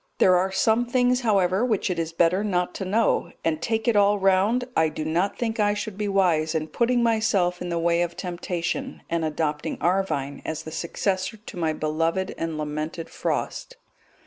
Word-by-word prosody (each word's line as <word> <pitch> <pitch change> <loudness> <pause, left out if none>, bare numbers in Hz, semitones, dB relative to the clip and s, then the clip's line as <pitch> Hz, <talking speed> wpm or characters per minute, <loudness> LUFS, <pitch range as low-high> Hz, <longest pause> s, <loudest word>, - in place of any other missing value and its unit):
There 185 - +5
are 185 +2 +1
some 225 +5 +2
things, 250 0 +2
however, 195 -3 +2
which 220 -6 0
it 175 - -2
is 165 0 -2
better 170 +4 +2
not 180 -4 0
to 190 - -4
know, 215 +4 +1
and 160 -1 0
take 225 -1 -1
it 235 - +3
all 205 0 +4
round 195 +6 +2
I 160 0 +3
do 155 0 -5
not 175 +6 0
think 225 -2 -2
I 205 0 +3
should 210 -1 -4
be 210 +1 -2
wise 170 -5 +2
in 155 0 -1
putting 240 +6 +1
myself 220 -6 +1
in 180 - -4
the 170 - -1
way 170 0 +2
of 170 -1 -2
temptation, 180 +8 -4
and 170 -1 0
adopting 150 -1 -2
Arvine 170 -6 -1
as 160 0 -4
the 160 - -8
successor 190 +5 -2
to 210 - -11
my 165 -3 0
beloved 165 +5 -1
and 165 -1 -3
lamented 155 +2 -4
Frost. - - -3
185 Hz, 190 wpm, -25 LUFS, 165-210 Hz, -, There